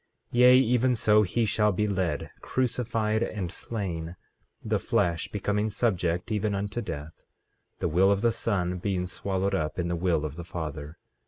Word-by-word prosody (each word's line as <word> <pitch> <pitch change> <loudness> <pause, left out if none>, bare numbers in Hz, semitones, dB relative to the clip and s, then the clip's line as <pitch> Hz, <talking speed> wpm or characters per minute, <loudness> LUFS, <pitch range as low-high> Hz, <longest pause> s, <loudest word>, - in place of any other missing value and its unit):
15:7 120 - +1
Yea, 125 +1 +8
even 125 0 +3
so 105 -1 +4
he 110 +4 +1
shall 105 +1 +2
be 105 +3 0
led, 90 -7 -1
crucified, 115 -3 0
and 100 -6 -2
slain, 90 -7 -4 0.5
the - - +1
flesh 85 -2 0
becoming 105 +1 -1
subject 95 -3 0
even 105 -1 0
unto 100 +4 -3
death, 75 -6 -7 0.5
the - - -1
will 95 +5 +4
of 100 0 +1
the 115 0 +3
Son 95 -5 -1
being 90 -1 -1
swallowed 95 +1 -2
up 75 -1 -1
in 85 -1 -1
the 85 - 0
will 85 -3 +1
of 75 0 -6
the 85 - -5
Father. 80 -2 -6
100 Hz, 170 wpm, -27 LUFS, 85-110 Hz, 0.5 s, Yea